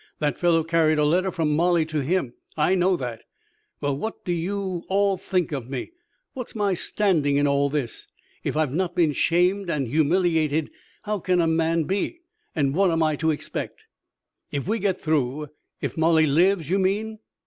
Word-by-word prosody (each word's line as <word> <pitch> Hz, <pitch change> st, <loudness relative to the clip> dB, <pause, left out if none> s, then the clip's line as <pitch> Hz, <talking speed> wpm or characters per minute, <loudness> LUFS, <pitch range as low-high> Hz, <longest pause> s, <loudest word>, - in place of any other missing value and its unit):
That 145 Hz, -4 st, -1 dB
fellow 170 Hz, -2 st, +3 dB
carried 160 Hz, -1 st, +2 dB
a 150 Hz, -, +3 dB
letter 180 Hz, +5 st, +2 dB
from 160 Hz, -5 st, 0 dB
Molly 170 Hz, 0 st, +3 dB
to 155 Hz, -1 st, -2 dB
him. 140 Hz, -3 st, -1 dB, 0.2 s
I 155 Hz, +4 st, +3 dB
know 185 Hz, 0 st, +2 dB
that. 120 Hz, -5 st, -5 dB, 0.6 s
Well, 145 Hz, -1 st, 0 dB
what 220 Hz, +11 st, -5 dB
do 180 Hz, -, -1 dB
you 180 Hz, +1 st, -2 dB
all 200 Hz, 0 st, +2 dB
think 180 Hz, -2 st, -1 dB
of 130 Hz, -4 st, -4 dB
me? 135 Hz, -, -5 dB, 0.4 s
What's 250 Hz, -4 st, -7 dB
my 205 Hz, -3 st, +1 dB
standing 170 Hz, -6 st, +1 dB
in 145 Hz, +1 st, +3 dB
all 140 Hz, 0 st, +2 dB
this? 140 Hz, -5 st, -3 dB, 0.4 s
If -, -, -2 dB
I've 155 Hz, -4 st, +1 dB
not 180 Hz, +1 st, -1 dB
been 160 Hz, -4 st, +3 dB
shamed 180 Hz, +5 st, +1 dB
and 145 Hz, -6 st, -1 dB
humiliated, 160 Hz, +1 st, +1 dB, 0.3 s
how 210 Hz, -1 st, -2 dB
can 180 Hz, 0 st, +1 dB
a 170 Hz, -, +3 dB
man 165 Hz, 0 st, +1 dB
be? 200 Hz, -, -2 dB, 0.3 s
And 140 Hz, -4 st, +1 dB
what 190 Hz, +3 st, +3 dB
am 165 Hz, -1 st, +1 dB
I 155 Hz, -1 st, +1 dB
to 160 Hz, +1 st, 0 dB
expect?" 150 Hz, -, -4 dB, 0.7 s
"If 140 Hz, +2 st, -3 dB
we 225 Hz, +3 st, 0 dB
get 190 Hz, -2 st, 0 dB
through, 150 Hz, -1 st, -1 dB, 0.3 s
if -, -, -3 dB
Molly 160 Hz, 0 st, +4 dB
lives, 170 Hz, +3 st, +2 dB
you 190 Hz, +4 st, +1 dB
mean?" 210 Hz, +3 st, -1 dB
165 Hz, 180 wpm, -24 LUFS, 150-185 Hz, 0.7 s, Molly